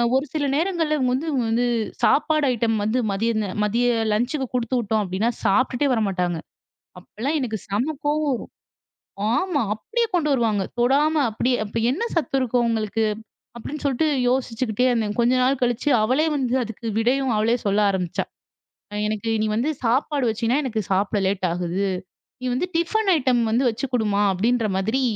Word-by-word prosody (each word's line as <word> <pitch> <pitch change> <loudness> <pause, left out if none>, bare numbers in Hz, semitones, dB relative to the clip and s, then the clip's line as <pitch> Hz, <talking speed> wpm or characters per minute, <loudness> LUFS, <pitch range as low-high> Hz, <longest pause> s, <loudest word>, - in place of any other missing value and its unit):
ஒரு 270 +2 +2
சில 295 -2 0
நேரங்கள்ல 325 -2 0
இவுங்க 255 -2 +1
வந்து 295 +5 -3
இவுங்க 250 -4 0
வந்து 240 +2 +2 0.4
சாப்பாடு 305 0 +3
ஐட்டம் 225 -1 0
வந்து 220 +4 0
மதிய 225 +4 0
இந்த 210 -2 -1 0.2
மதிய 235 +4 +1 0.3
லன்ச்சுக்கு 255 +5 -1
குடுத்து 245 +1 -1
விட்டோம் 220 -1 0
அப்பிடின்னா, 190 +4 -1 0.2
சாப்பிட்டுட்டே 255 +6 +2
வரமாட்டாங்க. 180 -6 0 0.6
அப்பல்லாம் 255 - -4
எனக்கு 225 -5 -2
செம்ம 240 +10 -1
கோவம் 305 +1 +1 0.7
வரும். - - - 0.3
ஆமா. 360 -6 0
அப்பிடியே 460 - -1
கொண்டு 310 -4 +1
வருவாங்க. 220 -6 +1 0.2
தொடாம 290 +5 +3
அப்பிடியே! 245 +3 0
அப்ப 205 - -5
என்ன 330 - -2
சத்து 310 -4 0
இருக்கும்? 245 -1 +1
அவுங்களுக்கு 225 -1 0 0.5
அப்பிடின்னு 290 +6 -7
சொல்ட்டு 280 +3 +1 0.2
யோசிச்சுக்கிட்டே 250 -2 0
இருந்தேன். 220 -3 -1
கொஞ்ச 240 +2 +3
நாள் 265 +1 +2
கழிச்சு 245 +4 +1
அவளே 260 +8 +2
வந்து 255 -3 -1
அதுக்கு 225 0 -7
விடையும் 255 +2 +1
அவளே 225 +3 +2
சொல்ல 205 +1 +2
ஆரம்பிச்சா. 180 -3 -2 0.8
எனக்கு 215 +1 -2
நீ 215 - +1
வந்து 265 +7 +1
சாப்பாடு 265 +3 +1
வச்சின்னா 230 +3 0
எனக்கு 230 -5 -2
சாப்பிட 200 +2 +1
லேட் 195 0 -1
ஆகுது. 180 +3 -1 0.5
நீ 255 - -8
வந்து 305 +8 0
டிஃபன் 390 +5 0
ஐட்டம் 255 -4 +2
வந்து 240 +4 +2
வச்சு 255 +5 -4
குடுமா! 210 -3 +1
அப்பிடின்ற 230 +4 +1
மாதிரி 220 +8 0
240 Hz, 160 wpm, -23 LUFS, 215-275 Hz, 0.8 s, சாப்பாடு